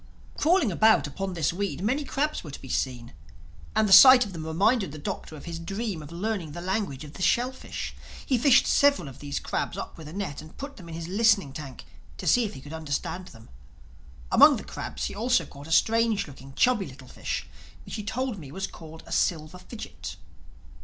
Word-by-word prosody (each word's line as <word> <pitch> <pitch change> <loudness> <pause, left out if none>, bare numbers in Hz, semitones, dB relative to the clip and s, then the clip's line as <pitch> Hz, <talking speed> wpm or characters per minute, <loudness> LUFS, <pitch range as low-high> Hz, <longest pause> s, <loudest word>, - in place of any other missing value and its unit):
Crawling 330 - +3
about 220 +5 +4
upon 190 +6 -4
this 165 -1 0
weed, 195 -1 -3
many 260 +8 +1
crabs 290 +2 -1
were 155 - -8
to 140 - -8
be - - -10
seen. 125 -2 -2 0.6
And 220 -1 +3
the 195 - +5
sight 250 +5 +10
of 200 - -9
them 160 -2 -6
reminded 195 - +2
the 155 - -8
Doctor 155 +1 -5
of 150 - -11
his 170 -1 -5
dream 195 0 -4
of 150 +1 -10
learning 180 -3 -3
the 175 - -6
language 185 -7 -2
of 150 -1 -10
the 185 - -10
shellfish. 250 +8 -1 0.3
He 255 -3 +1
fished 270 +1 +6
several 280 - +3
of 135 - -11
these 145 -1 -3
crabs - - -3
up - - -7
with 155 - -9
a 155 - -9
net 190 -7 -4
and 155 0 -14
put 280 +1 -7
them 175 -5 -11
in 160 - -6
his 165 0 -5
listening 200 -6 +3
tank 140 -4 -8 0.3
to - - -7
see 245 - +4
if 205 - -6
he 130 - -9
could 145 +3 -10
understand 160 +3 -4
them. 115 -7 -15 0.8
Among - - +8
the - - -7
crabs - - -5
he - - -4
also 220 -5 +1
caught 140 +1 -12
a - - -8
strange 225 +2 +3
looking, 135 -1 -12
chubby, 245 -6 +3
little 130 0 -12
fish - - -4 0.4
which - - -9
he 210 - -4
told 240 0 -3
me 140 -5 -10
was 190 +5 -3
called 160 -3 -11
a - - -13
Silver 160 +1 0
Fidgit. 215 +5 -8
185 Hz, 215 wpm, -27 LUFS, 155-225 Hz, 0.8 s, sight